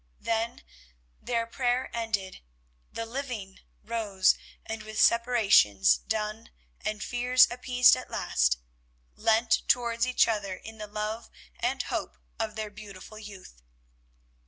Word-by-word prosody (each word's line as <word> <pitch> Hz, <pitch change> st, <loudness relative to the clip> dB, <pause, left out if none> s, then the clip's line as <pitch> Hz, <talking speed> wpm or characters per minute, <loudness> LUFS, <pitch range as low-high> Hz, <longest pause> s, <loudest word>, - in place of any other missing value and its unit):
Then, 225 Hz, +1 st, -2 dB, 0.6 s
their 230 Hz, -1 st, -1 dB
prayer 245 Hz, +2 st, -1 dB
ended, 220 Hz, -5 st, -3 dB, 0.5 s
the 230 Hz, -, -4 dB
living 230 Hz, -6 st, -6 dB, 0.2 s
rose, 210 Hz, -5 st, +2 dB, 0.3 s
and, 220 Hz, -1 st, -5 dB
with 215 Hz, 0 st, -6 dB
separations 210 Hz, -, +5 dB
done 215 Hz, -, -3 dB, 0.3 s
and 215 Hz, -3 st, -3 dB
fears 250 Hz, +5 st, +4 dB
appeased 250 Hz, 0 st, +5 dB
at -, -, -8 dB
last, -, -, +1 dB, 0.6 s
leant 225 Hz, +1 st, +2 dB
towards 235 Hz, 0 st, +2 dB
each 255 Hz, -, +4 dB
other 205 Hz, -4 st, -2 dB
in 225 Hz, +2 st, -11 dB
the 210 Hz, -, -6 dB
love 215 Hz, +2 st, -4 dB, 0.3 s
and -, -, 0 dB
hope 65 Hz, -, -4 dB, 0.2 s
of 215 Hz, -, -2 dB
their 215 Hz, -1 st, -4 dB
beautiful 205 Hz, 0 st, -11 dB
youth. 195 Hz, -, -12 dB
220 Hz, 120 wpm, -28 LUFS, 205-235 Hz, 0.6 s, separations